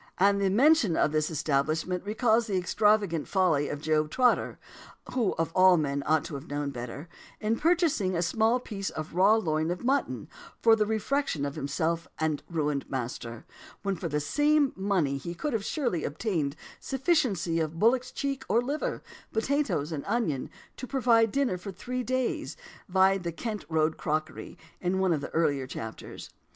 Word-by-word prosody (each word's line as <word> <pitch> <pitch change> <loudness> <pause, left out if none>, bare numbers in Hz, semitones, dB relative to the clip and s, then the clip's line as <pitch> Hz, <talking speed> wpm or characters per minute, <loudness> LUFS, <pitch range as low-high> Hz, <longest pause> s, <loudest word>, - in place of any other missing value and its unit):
And 200 +1 +4 0.2
mention 270 - +4
of - - +2
this 155 0 +1
establishment 155 +4 0
recalls 220 +2 +2
the 195 -3 0
extravagant 200 -3 +2
folly 170 -7 +2
of 145 - -5
Job 155 -1 +1
Trotter 250 +7 +2 0.6
(who 235 -6 +1
of 165 0 -1
all 185 -1 +6
men 140 -2 -1
ought 155 -1 +3
to - - -8
have 140 +3 -7
known 145 0 -2
better) 125 +5 -7 0.3
in 215 +1 0
purchasing 315 - +2
"a 170 - +1
small 225 +7 +2
piece 200 -5 -5
of 155 0 -6
raw 195 +5 +5
loin 160 -6 0
of 180 +4 -3
mutton" 270 +3 0 0.3
for 225 -1 +6
the 210 -1 +1
refection 220 - -1
of 140 - -3
himself 160 +4 -2
and 155 -2 -1
ruined 150 -4 -1
master; 120 -2 -5 0.4
when 195 -1 0
for 170 0 -4
the 150 0 0
same 295 - +2
money 185 -8 0
he 170 +5 -6
could 290 - -3
surely 240 - -1
have 145 - -3
obtained 155 -6 -1
a - - -18
sufficiency 255 - +1
of 160 0 -2
bullock's 245 +6 +3
cheek 275 -1 -3
or 230 - +4
liver, 300 - -2 0.3
potatoes, 220 - 0
and 150 -3 -4
onions, 200 - -1 0.3
to 255 - -6
provide 235 -5 +3
dinner 265 -9 0
for 195 +2 -7
three 250 +7 -4
days. 255 +1 -2 0.3
Vide 190 +1 +4
the 170 -1 -3
"Kent 210 +3 -5
Road 160 -1 +1
Cookery," 155 +1 -3 0.2
in 180 +1 0
one 190 -2 +2
of 150 - -1
my - - -4
earlier 145 -5 0
chapters. 110 -3 -8
185 Hz, 170 wpm, -28 LUFS, 155-230 Hz, 0.6 s, all